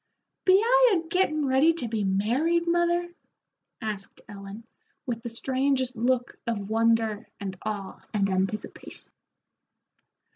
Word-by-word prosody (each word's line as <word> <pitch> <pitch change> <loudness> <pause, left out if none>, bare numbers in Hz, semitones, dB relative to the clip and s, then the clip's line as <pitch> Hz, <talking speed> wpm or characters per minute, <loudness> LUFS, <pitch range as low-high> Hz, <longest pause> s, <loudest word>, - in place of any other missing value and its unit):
"Be 370 - +6
I - - +5
a 330 -1 -5
gettin' 325 -4 +1
ready 275 +5 +4
to 275 -8 -3
be 220 -2 -1
married, 245 - +1
mother?" 345 0 +1 0.7
asked 205 -2 -5
Ellen, 200 +2 -9 0.4
with 235 -3 -3
the 235 - -5
strangest 260 +1 0
look 245 +1 0
of 210 -3 -3
wonder 225 -1 +2
and 195 -2 -5
awe 205 -3 -5
and 200 -2 +1
anticipation. 190 +2 -3
235 Hz, 120 wpm, -27 LUFS, 210-325 Hz, 0.7 s, Be